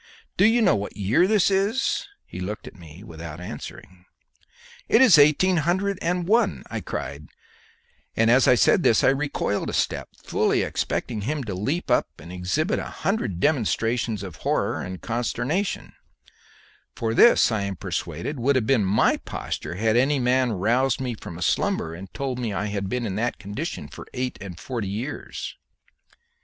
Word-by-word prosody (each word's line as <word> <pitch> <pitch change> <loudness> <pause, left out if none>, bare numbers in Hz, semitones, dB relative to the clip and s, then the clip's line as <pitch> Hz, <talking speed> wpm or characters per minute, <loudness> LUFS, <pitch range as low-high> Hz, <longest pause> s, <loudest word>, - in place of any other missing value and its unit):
"Do 190 - +4
you 230 +1 +4
know 190 - +4
what 100 +1 -5
year 110 - +3
this 205 -2 +3
is?" 200 - +1 0.2
He - - -9
looked 100 +3 -5
at - - -10
me 85 0 -13
without 85 -4 -8
answering. 90 0 -9 0.8
"It 225 - +5
is 240 - +7
eighteen 155 +6 +5
hundred 185 +5 0
and 175 0 -1
one," 225 +1 +2
I - - -3
cried, 70 +3 -6 0.9
and 115 +1 +3
as 130 +1 +5
I 125 - +7
said 180 - +4
this 115 - +3
I - - +6
recoiled 135 -7 -1
a - - -5
step, - - -1
fully - - +1
expecting 110 - -2
him 140 +6 -2
to 105 -5 -4
leap 135 - -2
up - - +3
and 85 - -11
exhibit 90 - -1
a - - -4 0.2
hundred 195 - 0
demonstrations 115 - 0
of 90 -5 -8
horror - - -1
and 90 0 -6
consternation; 130 - -2 1.0
for 115 -1 -1
this 235 - +6
I 110 -2 0
am 100 -1 -3
persuaded 145 - -4
would 135 +4 +2
have 125 -4 +2
been 120 -3 +3
my 95 +2 +3
posture - - -5
had 110 +3 +1
any 140 +4 +3
man 125 -1 +2
roused 120 +7 +1
me 130 -2 -2
from 85 -6 -9
a 90 - -3
slumber 80 - 0
and 90 +3 -9
told 130 -2 -3
me 120 -3 -2
I 105 +1 -2
had 100 -2 -2
been 125 +1 -2
in 100 -2 -3
that 120 +2 -1
condition 105 - -5
for - - -11
eight 125 0 -3
and 90 -4 -8
forty 115 -7 -4
years. 110 +8 -5
120 Hz, 175 wpm, -24 LUFS, 100-150 Hz, 1.0 s, is